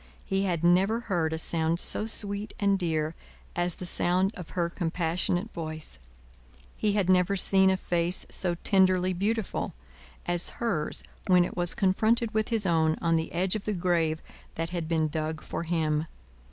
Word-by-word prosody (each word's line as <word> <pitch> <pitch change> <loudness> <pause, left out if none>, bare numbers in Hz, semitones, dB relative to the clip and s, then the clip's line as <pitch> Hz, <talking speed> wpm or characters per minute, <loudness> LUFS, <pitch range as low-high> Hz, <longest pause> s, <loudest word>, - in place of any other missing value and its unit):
He 195 0 0
had 175 -3 -1
never 190 +7 +3
heard 175 -8 -1
a 160 - -2
sound 165 +1 0
so 215 - 0
sweet 205 -1 -1
and 200 -1 +2
dear 160 -3 -1 0.4
as 175 0 0
the 180 - -7
sound 185 +3 +1
of 180 -3 -9
her 170 -1 +2
compassionate 175 +3 -2
voice; 155 - -6 0.8
he 210 -2 0
had 200 -3 +1
never 185 +1 +3
seen 190 0 +6
a 190 - +2
face 175 0 0
so 175 -2 +1
tenderly 185 -2 +3
beautiful, 210 +4 -2 0.5
as 175 0 +1
hers 175 -11 -1 0.2
when 180 -1 +5
it - - -7
was 175 -1 -1
confronted 220 +4 +1
with 220 0 0
his 225 -4 +2
own 160 -3 +2
on 165 -1 +1
the 160 0 -1
edge 180 +3 +1
of 215 - -4
the 215 - -1
grave 170 -3 0 0.3
that 165 +1 -3
had 170 -3 -3
been 160 -1 +1
dug 155 0 -3
for - - -4
him. 160 -2 0
175 Hz, 170 wpm, -28 LUFS, 165-195 Hz, 0.8 s, seen